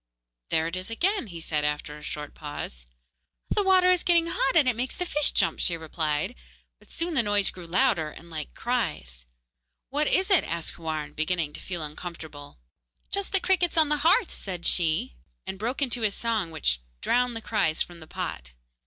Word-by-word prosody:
'There 160 Hz, 0 st, +2 dB
it 165 Hz, +2 st, -3 dB
is 185 Hz, +2 st, -4 dB
again,' 365 Hz, -, 0 dB
he 170 Hz, -4 st, -8 dB
said, 155 Hz, -2 st, -1 dB
after 150 Hz, 0 st, -1 dB
a 150 Hz, -, -11 dB
short 150 Hz, 0 st, -5 dB
pause. -, -, -7 dB, 0.6 s
'The 415 Hz, -, +3 dB
water 375 Hz, -2 st, +5 dB
is 360 Hz, -1 st, +3 dB
getting 340 Hz, -2 st, +4 dB
hot, 305 Hz, -4 st, 0 dB
and 305 Hz, -5 st, +6 dB
it 250 Hz, -, +3 dB
makes 250 Hz, +3 st, -2 dB
the 360 Hz, -, -2 dB
fish 295 Hz, -4 st, +2 dB
jump,' -, -, +1 dB
she 170 Hz, -, +1 dB
replied; 155 Hz, -2 st, -1 dB, 0.5 s
but -, -, -23 dB
soon 335 Hz, +1 st, -2 dB
the 270 Hz, -, +4 dB
noise 205 Hz, -2 st, +1 dB
grew 180 Hz, -2 st, -10 dB
louder 180 Hz, -4 st, +2 dB
and 170 Hz, +3 st, -13 dB
like 155 Hz, -2 st, -5 dB
cries. 60 Hz, -, -2 dB, 0.6 s
'What 295 Hz, +2 st, +1 dB
is 380 Hz, +2 st, +2 dB
it?' 375 Hz, -, +6 dB
asked 170 Hz, 0 st, -3 dB
Houarn, 155 Hz, -2 st, -4 dB
beginning 155 Hz, -1 st, -1 dB
to -, -, -8 dB
feel 175 Hz, -4 st, -4 dB
uncomfortable. 150 Hz, -, -8 dB, 0.5 s
'Just 400 Hz, -1 st, -1 dB
the 390 Hz, -, +5 dB
crickets 365 Hz, -3 st, +2 dB
on 315 Hz, -2 st, +5 dB
the 300 Hz, -, +2 dB
hearth,' 355 Hz, +8 st, +4 dB
said 180 Hz, -3 st, -5 dB
she, 160 Hz, -, +1 dB, 0.3 s
and 190 Hz, -, -5 dB
broke 245 Hz, +6 st, -1 dB
into 245 Hz, -2 st, -1 dB
a 215 Hz, -, +3 dB
song 215 Hz, -3 st, -1 dB
which 150 Hz, -, +1 dB, 0.2 s
drowned 245 Hz, -1 st, +2 dB
the -, -, -3 dB
cries 160 Hz, -9 st, +1 dB
from 175 Hz, -1 st, -12 dB
the 160 Hz, -, -12 dB
pot. 60 Hz, -, -5 dB
185 Hz, 195 wpm, -27 LUFS, -, 0.6 s, and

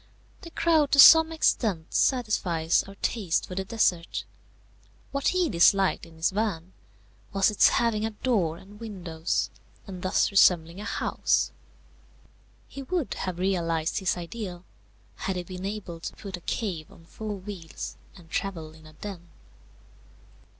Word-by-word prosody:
The 340 Hz, -, -9 dB
crowd 320 Hz, -4 st, +2 dB
to -, -, +4 dB
some 320 Hz, +3 st, +9 dB
extent 210 Hz, -, 0 dB
satisfies 185 Hz, -10 st, +2 dB
our 195 Hz, -, -11 dB
taste 200 Hz, -8 st, 0 dB
for -, -, -8 dB
the 190 Hz, +1 st, -2 dB
desert. 190 Hz, -5 st, 0 dB, 0.9 s
What 280 Hz, 0 st, -1 dB
he 365 Hz, -2 st, +2 dB
disliked 190 Hz, -, +3 dB
in 165 Hz, -, -17 dB
his 160 Hz, +3 st, 0 dB
van 190 Hz, -4 st, -2 dB, 0.6 s
was 195 Hz, +1 st, +3 dB
its 210 Hz, -, +5 dB
having 230 Hz, -3 st, +1 dB
a 220 Hz, -, 0 dB
door 210 Hz, -8 st, 0 dB
and 205 Hz, +4 st, -15 dB
windows, 180 Hz, -7 st, -3 dB, 0.3 s
and 185 Hz, -3 st, -8 dB
thus 185 Hz, +2 st, +1 dB
resembling 175 Hz, -3 st, +4 dB
a -, -, -7 dB
house. -, -, 0 dB, 1.2 s
He 275 Hz, -, -8 dB
would 330 Hz, +1 st, -2 dB
have 185 Hz, -2 st, -4 dB
realized 170 Hz, -4 st, 0 dB
his 190 Hz, -2 st, 0 dB
ideal, 180 Hz, 0 st, -7 dB, 0.5 s
had 190 Hz, -, -3 dB
he 180 Hz, -, -3 dB
been 185 Hz, +1 st, -7 dB
able 195 Hz, -5 st, -5 dB
to -, -, -7 dB
put 195 Hz, -2 st, -7 dB
a 175 Hz, -, -11 dB
cave 175 Hz, -6 st, -4 dB
on 165 Hz, -, -17 dB
four 215 Hz, +4 st, -6 dB
wheels 165 Hz, -, -7 dB, 0.2 s
and 170 Hz, -, -15 dB
travel 165 Hz, -3 st, -4 dB
in 160 Hz, -1 st, -16 dB
a 155 Hz, -, -15 dB
den. 175 Hz, 0 st, -9 dB
190 Hz, 150 wpm, -27 LUFS, 170-215 Hz, 1.2 s, some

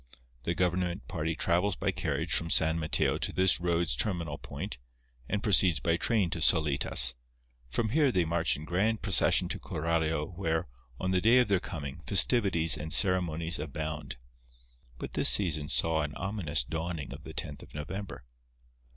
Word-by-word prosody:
The 85 Hz, -, -1 dB
government 90 Hz, 0 st, -1 dB
party 80 Hz, -2 st, -3 dB
travels 90 Hz, +4 st, +1 dB
by -, -, -1 dB
carriage -, -, -2 dB
from 85 Hz, -, -1 dB
San 80 Hz, 0 st, +2 dB
Mateo 80 Hz, -1 st, 0 dB
to -, -, -2 dB
this 95 Hz, -1 st, +2 dB
road's 85 Hz, -5 st, 0 dB
terminal 85 Hz, -, -2 dB
point, 65 Hz, -, -7 dB, 0.5 s
and 105 Hz, +1 st, -2 dB
proceeds 95 Hz, -5 st, +4 dB
by 85 Hz, -1 st, +1 dB
train 95 Hz, -1 st, 0 dB
to 85 Hz, -, -3 dB
Solitas. 70 Hz, -5 st, +4 dB, 0.6 s
From 110 Hz, -, -1 dB
here 145 Hz, +2 st, +2 dB
they 90 Hz, -6 st, +1 dB
march 85 Hz, 0 st, +1 dB
in 75 Hz, -, -9 dB
grand 105 Hz, +7 st, -1 dB
procession 95 Hz, -5 st, +3 dB
to -, -, -3 dB
Coralio 80 Hz, +1 st, -2 dB
where, 80 Hz, -2 st, -2 dB, 0.3 s
on 95 Hz, -, -2 dB
the 90 Hz, -1 st, +1 dB
day 115 Hz, +5 st, +5 dB
of 125 Hz, -4 st, +3 dB
their 100 Hz, -2 st, +3 dB
coming, 70 Hz, -6 st, -7 dB
festivities 95 Hz, -9 st, +4 dB
and 75 Hz, +1 st, -6 dB
ceremonies 85 Hz, -4 st, +2 dB
abound. 75 Hz, -2 st, -5 dB, 0.8 s
But -, -, -7 dB
this -, -, +3 dB
season 80 Hz, -7 st, +1 dB
saw 80 Hz, -1 st, +1 dB
an 75 Hz, -1 st, -4 dB
ominous 85 Hz, -, 0 dB
dawning 80 Hz, +2 st, -5 dB
of -, -, -11 dB
the -, -, -10 dB
tenth -, -, -5 dB
of -, -, -15 dB
November. 95 Hz, +5 st, -7 dB
85 Hz, 165 wpm, -29 LUFS, 80-95 Hz, 0.8 s, day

